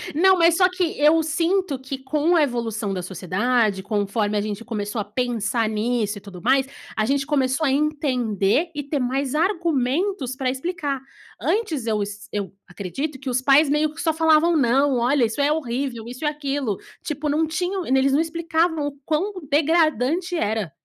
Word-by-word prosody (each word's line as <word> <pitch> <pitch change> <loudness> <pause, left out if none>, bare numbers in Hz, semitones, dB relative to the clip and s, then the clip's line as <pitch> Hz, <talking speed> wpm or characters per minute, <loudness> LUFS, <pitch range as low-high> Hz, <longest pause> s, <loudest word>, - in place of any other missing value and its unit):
Não, 375 +3 +5
mas 335 0 +5
só 365 0 +4
que 365 -2 -2
eu 305 +3 +5
sinto 330 0 0
que 265 +1 -6
com 300 +6 +1
a 310 - +5
evolução 225 -6 -2
da 180 - -3
sociedade, 195 +3 0
conforme 205 0 -1
a - - +1
gente 210 +1 -4
começou 210 -1 -3
a - - -2
pensar 230 0 -1
nisso 215 -1 -1
e - - -10
tudo 190 -4 -11
mais, 270 +5 +3 0.3
a 215 - +1
gente 275 +2 0
começou 275 +1 +1
a 270 - +2
entender 275 - +1
e 290 - -3
ter 280 0 -2
mais 265 +2 -1
argumentos 335 -3 0
para 260 -1 -1
explicar. 280 -1 -3 0.4
Antes 330 - -1
eu 215 -2 +1
es 205 0 -6
eu 200 -3 -4
acredito 265 - -5
que 270 -1 -5
os 250 +1 0
pais 280 +3 +5
meio 300 +1 +1
que 325 - -7
só 320 -2 +1
falavam: 320 +1 +4
"Não, 270 0 +3
olha, 250 +1 +3
isso 225 +6 -2
é 290 +1 +3
horrível, 255 -5 -2
isso 255 +5 -8
e - - +2
aquilo". 280 -7 -2 0.3
Tipo, 300 0 -3
não 305 +2 +2
tinham 355 +3 -2
eles 265 +1 +2
não 300 - +4
explicavam 330 -2 0
o 280 - -7
quão 345 +7 0 0.2
degradante 320 +2 +2
era. 210 - -1
275 Hz, 180 wpm, -23 LUFS, 230-315 Hz, 0.4 s, Não